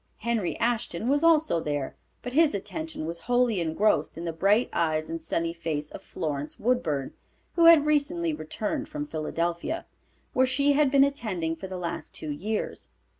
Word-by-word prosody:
Henry 225 -5 -1
Ashton 235 -4 -1
was 290 +3 +3
also 315 - +4
there, 145 -3 -3 0.3
but 245 - -5
his 310 -5 +4
attention 315 - -5
was 170 +1 -4
wholly 245 +1 +2
engrossed 160 -1 +1
in 170 - -5
the 165 - -2
bright 200 +8 +3
eyes 155 -1 0
and 165 0 -4
sunny 165 +1 -1
face 155 -3 -4
of - - -8
Florence 145 -1 -4
Woodburn, 170 - 0 0.4
who 335 - +4
had 330 -3 +8
recently 305 +3 +1
returned 280 - -3
from 300 -1 -4
Philadelphia, 170 - -2 0.5
where 260 0 +4
she 280 +2 +2
had 290 -1 +4
been 275 0 +6
attending 210 -13 -1
for 175 +4 -7
the 185 -1 -5
last 170 -1 -5
two 155 - -5
years. 210 +9 -3
210 Hz, 170 wpm, -27 LUFS, -, 0.5 s, had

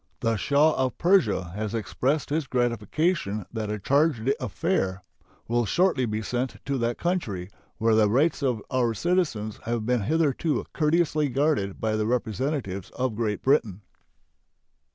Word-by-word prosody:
The 115 0 +1
Shah 145 +8 +3
of 130 - -2
Persia 170 - +2
has 110 +2 -3
expressed 135 +7 -1
his 155 -2 0
gratification 120 - 0
that 110 -2 -3
a 105 - -2
charge 140 +2 +1
d'affaires 135 - 0 0.5
will 120 +1 +1
shortly 170 - +2
be 110 0 -2
sent 125 +3 -2
to 135 0 -1
that 120 0 -1
country, 110 - -2 0.3
where 115 0 +2
the 110 -1 +4
rights 145 +10 +2
of 125 -6 0
our 120 -3 +1
citizens 120 - -1
have 115 -1 -2
been 125 -1 +1
hitherto 155 +5 0
courteously 155 -1 +2
guarded 135 -8 0
by 110 -1 0
the 110 0 0
representatives 120 - -2
of 130 -2 -1
Great 105 -2 -2
Britain. 115 -8 +2
125 Hz, 145 wpm, -26 LUFS, 110-150 Hz, 0.5 s, the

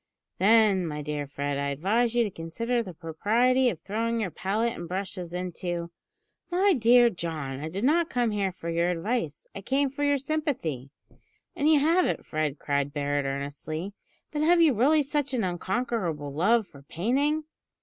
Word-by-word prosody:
"Then, 200 -3 +4
my 150 -1 -4
dear 145 -1 -3
Fred, 140 0 -3
I 140 0 -1
advise 215 - +1
you 240 - +4
to 210 - -3
consider 230 +10 -2
the 185 -6 -8
propriety 235 +11 +2
of 175 - -5
throwing 230 +3 -2
your 200 -5 -2
palette 215 +7 -1
and 170 - -7
brushes 185 -1 -5
into 175 -1 -4 0.3
" 430 -3 -46
"My 395 0 +5
dear 240 -2 +5
John, 155 -7 -4
I 155 +2 -4
did 195 +6 -4
not 325 +5 +3
come 240 -2 0
here 200 -2 0
for 175 -2 -9
your 170 +1 +1
advice. 180 - -2
I 200 - -7
came 270 +6 0
for 290 +2 -4
your 285 0 +3
sympathy." 270 - -2 0.7
"And 295 +2 +2
you 305 - +6
have 335 +5 +3
it, - - -3
Fred," 155 -2 -2
cried 140 0 -1
Barret 145 -1 -1
earnestly. 145 +6 -4 0.4
"But 295 - -2
have 340 +3 +4
you 320 -4 +5
really 290 +7 +4
such 280 -1 -1
an 230 - 0
unconquerable 180 - -2
love 215 +9 +3
for 140 -6 -16
painting?" 270 - 0
200 Hz, 180 wpm, -27 LUFS, 160-250 Hz, 0.7 s, you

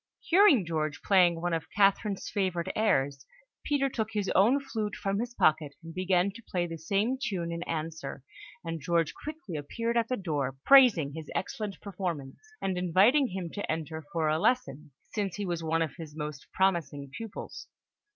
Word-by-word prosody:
Hearing 340 - +5
George 155 -3 -2
playing 180 -4 +4
one 175 0 -1
of 165 - -2
Catherine's 200 0 +2
favourite 185 -4 -1
airs, 140 -11 +1 0.4
Peter 280 -2 +1
took 225 -4 -3
his 205 -2 -1
own 230 +9 +5
flute 220 -7 -4
from 195 0 -1
his 240 +1 -4
pocket, 150 -2 +2
and 165 0 -9
began 185 +1 +1
to 230 +4 -12
play 180 -5 -2
the 165 -1 -6
same 205 +10 0
tune 180 -8 -2
in 170 0 -4
answer; 155 -4 -4 0.4
and 165 -1 -4
George 165 +1 +1
quickly 305 - -7
appeared 230 +11 -2
at 230 -1 +2
the 255 - -1
door, 145 -8 -2
praising 235 - +6
his 160 0 -8
excellent 210 -1 -3
performance, 175 -9 -4 0.2
and 185 -2 0
inviting 200 - +4
him 185 -4 -5
to 205 - -3
enter 160 0 -4
for 160 -2 0
a 155 +1 +2
lesson, 155 - 0 0.2
since 200 -5 -2
he 205 - -3
was 170 -2 -3
one 165 +1 +1
of 160 - -6
his 155 -3 -9
most 150 -2 -6
promising 155 -7 0
pupils. 225 -3 -7
180 Hz, 175 wpm, -29 LUFS, 160-210 Hz, 0.4 s, praising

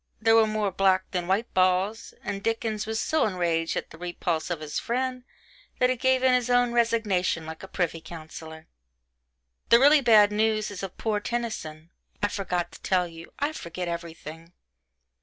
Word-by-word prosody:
There 225 0 +4
were 225 -1 +6
more 215 -2 -1
black 190 0 +2
than 180 -2 -2
white 200 +5 0
balls, 185 +4 +1
and 200 - -4
Dickens 220 -1 -2
was 220 0 -2
so 315 -1 +1
enraged 170 -4 -1
at - - -5
the 160 - -13
repulse 175 -2 -2
of 175 -3 -2
his 150 -1 -3
friend 255 +1 -2 0.5
that 250 0 +3
he - - +1
gave 260 +1 +2
in 260 -1 +5
his 250 -1 +1
own 245 -1 +3
resignation 215 -8 +1
like 160 0 -8
a 190 - -8
privy 170 -3 -2
councillor. 160 -1 -10 1.0
But - - +8
the - - +7
really 290 +3 +6
bad 215 -4 +6
news 215 0 +1
is 200 - -7
of 195 -2 -7
poor 215 -2 -1
Tennyson 205 -9 -4 0.3
I 205 - +3
forgot 185 -4 -2
to - - -14
tell 180 -2 +1
you 165 0 -12
I 290 +2 -1
forget 180 - -6
everything. 165 -1 -7
195 Hz, 180 wpm, -26 LUFS, 170-230 Hz, 1.0 s, But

